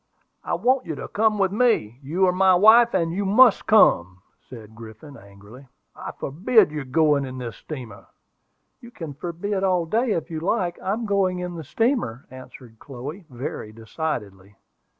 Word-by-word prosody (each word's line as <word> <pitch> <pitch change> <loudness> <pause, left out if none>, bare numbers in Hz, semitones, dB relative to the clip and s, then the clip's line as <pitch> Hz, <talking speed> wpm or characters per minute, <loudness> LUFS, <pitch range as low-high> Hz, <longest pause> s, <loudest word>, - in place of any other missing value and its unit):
"I - - -2
want 255 -2 +1
you 160 - -4
to - - -7
come 215 0 +1
with 195 -2 +1
me; 205 - 0
you 165 +8 0
are 180 - +3
my 190 0 +4
wife 225 +5 +6
and 165 -1 0
you 200 +3 -2
must 215 +3 +4
come!" 95 - +3 0.3
said 110 -4 -12
Griffin, 115 +6 -12
angrily. 100 +5 -15 0.3
"I - - -7
forbid 190 - +2
your 150 -2 -5
going 145 +1 +2
in 130 -1 -7
this 120 -3 -7
steamer." 130 -8 -10 0.7
"You 235 - -13
can 165 -10 -8
forbid 180 +6 -4
all 180 -3 +1
day 225 +6 0
if 165 -1 -4
you 160 - -4
like; 175 0 -2
I'm 215 +5 -2
going 195 -3 0
in 180 0 -5
the 165 -2 -7
steamer!" 185 - -1
answered 130 -3 -13
Chloe, 145 +8 -9
very 120 -4 -7
decidedly. 105 - -6
160 Hz, 170 wpm, -23 LUFS, 125-200 Hz, 0.7 s, wife